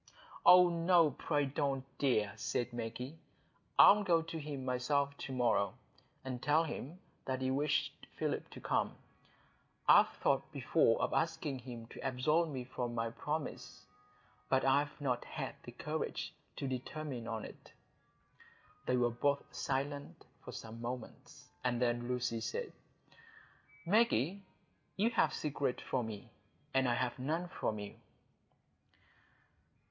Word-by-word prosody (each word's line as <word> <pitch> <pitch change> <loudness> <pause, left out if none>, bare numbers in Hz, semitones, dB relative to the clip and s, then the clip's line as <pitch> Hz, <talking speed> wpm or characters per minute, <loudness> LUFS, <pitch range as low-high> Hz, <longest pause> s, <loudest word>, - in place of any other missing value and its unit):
"Oh 180 0 +9
no, 170 -2 +4
pray 145 +2 0
don't, 135 -1 -1
dear," 110 -8 +2
said 120 +2 -2
Maggie. 120 +6 -5 0.6
"I'll 210 +1 +9
go 170 -4 +3
to 165 0 -5
him 145 -3 -5
myself 140 +3 +1
to - - -5
morrow, 120 -5 +2 0.5
and 125 -2 -4
tell 150 +4 +4
him 160 0 -5 0.3
that 130 0 -2
you 130 0 +1
wish 145 +3 +1 0.2
Philip - - -2
to - - -10
come. - - 0 0.9
I've - - +8
thought - - 0
before - - +3
of - - 0
asking 135 -3 0
him 120 -2 -8
to - - -10
absolve 155 +6 +2
me 130 -4 -4
from 120 -1 -4
my 115 0 -1
promise, 150 +6 -4 0.6
but 130 0 +3
I've 140 +2 +2
not 125 -4 0
had - - -5
the - - -7
courage - - -3 0.2
to 140 - -3
determine 130 -1 -4
on 110 -1 -3
it." - - -12 1.2
They 125 - +3
were 120 -1 +3
both 140 +4 +1
silent 140 +1 -3 0.2
for - - -7
some 115 +1 -8
moments, 120 0 -7 0.2
and 125 -1 +1
then 120 -1 +1
Lucy 125 -2 -1
said,— 480 - -3 1.1
"Maggie, 200 - +3 0.6
you 220 +4 +3
have - - +3
secrets 145 -4 -2
from 125 -3 -1
me, 110 +2 -8 0.4
and 135 -1 +3
I 120 - +2
have 125 +1 -1
none 160 +7 -1
from 110 -10 -2
you." 105 -1 -6
130 Hz, 135 wpm, -35 LUFS, 120-150 Hz, 1.2 s, Oh